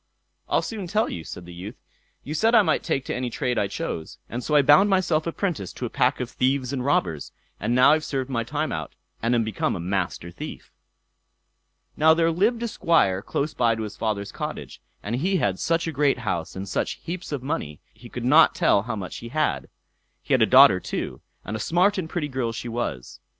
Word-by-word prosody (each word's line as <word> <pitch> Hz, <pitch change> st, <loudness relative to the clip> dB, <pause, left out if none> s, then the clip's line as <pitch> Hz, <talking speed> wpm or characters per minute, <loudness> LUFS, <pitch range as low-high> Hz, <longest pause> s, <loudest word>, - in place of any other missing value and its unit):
I'll -, -, +2 dB
soon 210 Hz, -5 st, -5 dB
tell 215 Hz, +5 st, +1 dB
you", 85 Hz, -, -5 dB
said 85 Hz, -, -9 dB
the 90 Hz, -, -10 dB
youth. 90 Hz, +5 st, -8 dB, 0.5 s
"You 150 Hz, -, -5 dB
said 225 Hz, +9 st, +3 dB
I 220 Hz, -, +7 dB
might -, -, +1 dB
take 135 Hz, -6 st, -2 dB
to -, -, -3 dB
any 125 Hz, 0 st, -2 dB
trade 125 Hz, -1 st, -1 dB
I 100 Hz, -, +1 dB
chose, 85 Hz, -4 st, -5 dB
and 120 Hz, +1 st, -5 dB
so 150 Hz, -, 0 dB
I 145 Hz, -, +6 dB
bound 150 Hz, +9 st, +6 dB
myself 175 Hz, -5 st, +1 dB
apprentice 165 Hz, -, -2 dB
to -, -, -5 dB
a -, -, -5 dB
pack -, -, +1 dB
of 125 Hz, -, -2 dB
thieves 130 Hz, +1 st, 0 dB
and 130 Hz, -2 st, -2 dB
robbers, 85 Hz, -, 0 dB, 0.3 s
and 120 Hz, -, 0 dB
now 130 Hz, +3 st, +6 dB
I've 155 Hz, 0 st, +1 dB
served 135 Hz, -4 st, -2 dB
my 120 Hz, -4 st, -1 dB
time 150 Hz, +6 st, -2 dB
out, 80 Hz, -3 st, -5 dB, 0.3 s
and 115 Hz, +2 st, +2 dB
am 115 Hz, -, +2 dB
become 110 Hz, -2 st, -1 dB
a -, -, -5 dB
Master 90 Hz, -1 st, -2 dB
Thief." 85 Hz, -, -9 dB, 1.2 s
Now 160 Hz, +1 st, +5 dB
there 165 Hz, 0 st, +2 dB
lived 220 Hz, +8 st, +1 dB
a -, -, 0 dB
Squire 100 Hz, -, +2 dB
close 145 Hz, +7 st, -2 dB
by 120 Hz, -4 st, +2 dB
to 110 Hz, -, -4 dB
his 105 Hz, -1 st, -6 dB
father's 100 Hz, -2 st, -2 dB
cottage, -, -, -6 dB, 0.2 s
and 115 Hz, +4 st, -2 dB
he 185 Hz, +7 st, +1 dB
had 100 Hz, -, 0 dB
such 165 Hz, 0 st, 0 dB
a -, -, -1 dB
great 145 Hz, -2 st, +2 dB
house, 85 Hz, -9 st, -3 dB
and 95 Hz, +1 st, -5 dB
such -, -, -1 dB
heaps 175 Hz, 0 st, -6 dB
of 140 Hz, -4 st, -3 dB
money, 130 Hz, -, -3 dB
he 120 Hz, +2 st, -14 dB
could 120 Hz, 0 st, -5 dB
not 150 Hz, +6 st, +6 dB
tell 100 Hz, -, +3 dB
how 110 Hz, +2 st, -4 dB
much 95 Hz, -3 st, -6 dB
he 115 Hz, -, -8 dB
had. 115 Hz, -, -1 dB, 0.5 s
He -, -, -1 dB
had -, -, +4 dB
a -, -, +5 dB
daughter -, -, +7 dB
too, -, -, -5 dB, 0.2 s
and 105 Hz, -, -4 dB
a -, -, -4 dB
smart 180 Hz, -, +2 dB
and 160 Hz, -3 st, -4 dB
pretty 160 Hz, -4 st, -2 dB
girl 130 Hz, -4 st, -2 dB
she 115 Hz, +1 st, -6 dB
was. 115 Hz, -, -4 dB
125 Hz, 225 wpm, -24 LUFS, 105-160 Hz, 1.2 s, I